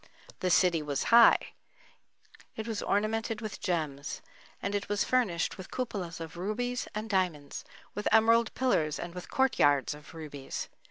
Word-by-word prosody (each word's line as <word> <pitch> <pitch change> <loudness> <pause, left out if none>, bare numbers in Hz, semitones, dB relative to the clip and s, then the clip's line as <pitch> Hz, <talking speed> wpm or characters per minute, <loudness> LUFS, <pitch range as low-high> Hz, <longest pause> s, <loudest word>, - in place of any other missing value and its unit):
The 185 - 0
city 175 -1 +4
was 145 -2 -2
high,—it 230 -1 +1
was 220 -2 -2
ornamented 220 +2 0
with 215 -2 -6
gems; 150 -6 -2 0.4
and 200 - -3
it 200 -1 -2
was 205 -1 +1
furnished 200 -9 0
with 185 - -8
cupolas 195 -10 -4
of 165 +1 -8
rubies 240 +7 -2
and 215 +1 -3
diamonds,—with 185 +1 -3
emerald 230 +1 +5
pillars, 160 - +1
and 175 0 -6
with 180 0 -8
court 265 -1 +1
yards 145 0 +4
of 150 +1 -13
rubies. 145 -4 -6
190 Hz, 145 wpm, -30 LUFS, 160-225 Hz, 0.4 s, emerald